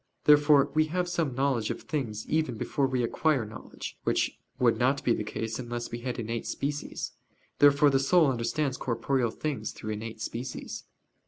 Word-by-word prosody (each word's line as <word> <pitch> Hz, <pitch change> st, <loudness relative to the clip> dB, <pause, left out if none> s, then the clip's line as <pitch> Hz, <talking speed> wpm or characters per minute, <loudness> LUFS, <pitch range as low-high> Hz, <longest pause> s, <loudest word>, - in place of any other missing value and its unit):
Therefore 145 Hz, -1 st, +6 dB
we 155 Hz, +1 st, +4 dB
have 180 Hz, +3 st, -1 dB
some 165 Hz, -7 st, -1 dB
knowledge 130 Hz, -5 st, +1 dB
of -, -, -4 dB
things 115 Hz, -8 st, -3 dB
even 155 Hz, -7 st, 0 dB
before 135 Hz, +4 st, 0 dB
we 130 Hz, -2 st, 0 dB
acquire 135 Hz, 0 st, +1 dB
knowledge; 105 Hz, -, -9 dB
which -, -, 0 dB, 0.2 s
would 115 Hz, -3 st, +3 dB
not 130 Hz, +3 st, +2 dB
be 120 Hz, -, +3 dB
the 105 Hz, -, -2 dB
case 110 Hz, +2 st, -4 dB
unless 120 Hz, -1 st, -4 dB
we 120 Hz, -, -4 dB
had 125 Hz, +1 st, -4 dB
innate 115 Hz, 0 st, -3 dB
species. 145 Hz, +1 st, -3 dB, 0.5 s
Therefore 145 Hz, 0 st, +6 dB
the 135 Hz, -, +3 dB
soul 160 Hz, +5 st, +4 dB
understands 130 Hz, +2 st, 0 dB
corporeal 120 Hz, +1 st, 0 dB
things 130 Hz, -4 st, -3 dB
through 110 Hz, -, -6 dB
innate 110 Hz, +1 st, -5 dB
species. 120 Hz, +3 st, -5 dB
130 Hz, 170 wpm, -28 LUFS, 115-145 Hz, 0.5 s, Therefore